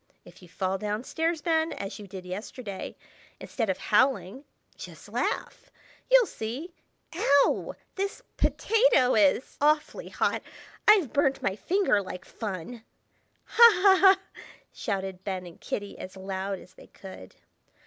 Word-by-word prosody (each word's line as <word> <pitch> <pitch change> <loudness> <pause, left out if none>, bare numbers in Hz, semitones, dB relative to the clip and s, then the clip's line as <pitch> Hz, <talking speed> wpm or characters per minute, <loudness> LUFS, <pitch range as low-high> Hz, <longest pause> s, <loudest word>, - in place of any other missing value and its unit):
If - - -16
you 180 - -15
fall 190 +2 -2
down 210 +3 -3
stairs, 325 +2 -2
Ben, 320 -1 +1
as 200 +2 -6
you 205 - -10
did 185 -1 -9
yesterday, 200 +2 -7 0.4
instead 225 -5 -3
of 190 - 0
howling, 230 +2 +1 0.3
just - - -11
laugh! - - -3 0.4
You'll - - +7
see—ow! 280 - -1 0.2
this 395 +1 -4
potato 445 - +3
is 210 +3 +2
awfully 300 +1 +1
hot. - - 0 0.5
I've 395 - +5
burned 275 -1 +2
my 190 - 0
finger 360 - +1
like 185 -1 -8
fun." 215 +2 -6 0.6
"Ha! 470 0 +8
ha! 390 -2 +7
ha!" 385 0 +3 0.3
shouted 190 -3 -4
Ben 190 -3 -4
and 170 -1 -13
Kitty, 205 -1 -5
as 185 +1 -9
loud 190 +1 -4
as 185 - -16
they - - -16
could. 185 - -12
220 Hz, 135 wpm, -27 LUFS, 190-320 Hz, 0.6 s, Ha